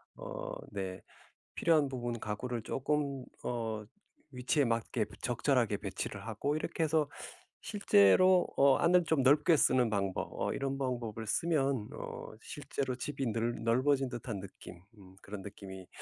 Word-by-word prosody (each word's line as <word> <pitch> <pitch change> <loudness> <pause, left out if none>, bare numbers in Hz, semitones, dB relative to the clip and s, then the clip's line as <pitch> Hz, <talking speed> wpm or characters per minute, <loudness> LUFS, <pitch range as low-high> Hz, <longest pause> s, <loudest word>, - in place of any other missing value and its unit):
어 - - -6 0.2
네 95 -1 -4 0.5
필요한 155 -4 +3
부분 120 -3 -3
가구를 115 +3 -3
쪼끔 140 0 -1 0.2
어 110 -3 -3 0.5
위치에 130 +2 +1
맞게 115 -1 0 0.2
적절하게 - - +1
배치를 - - -5
하고 130 +7 -1
이렇게 160 +1 -2
해서 155 -2 +2 0.5
실제로 185 - +5
어 140 -1 +6
안을 180 0 +4
좀 160 -4 +2
넓게 150 +5 +5
쓰는 125 -4 +4
방법 100 -3 -1
어 - - -1
이런 135 0 -2
방법을 120 -4 -3
쓰면 135 -4 +1
어 - - -7
실제로 135 -2 -4
집이 135 +1 -3
늘 115 +2 -2
넓어진 130 +3 +2
듯한 115 -4 -5
느낌 90 -2 -11 0.2
음 95 -1 -15
그런 100 0 -7
느낌이 95 -2 -9
130 Hz, 275 characters per minute, -32 LUFS, 110-145 Hz, 0.5 s, 어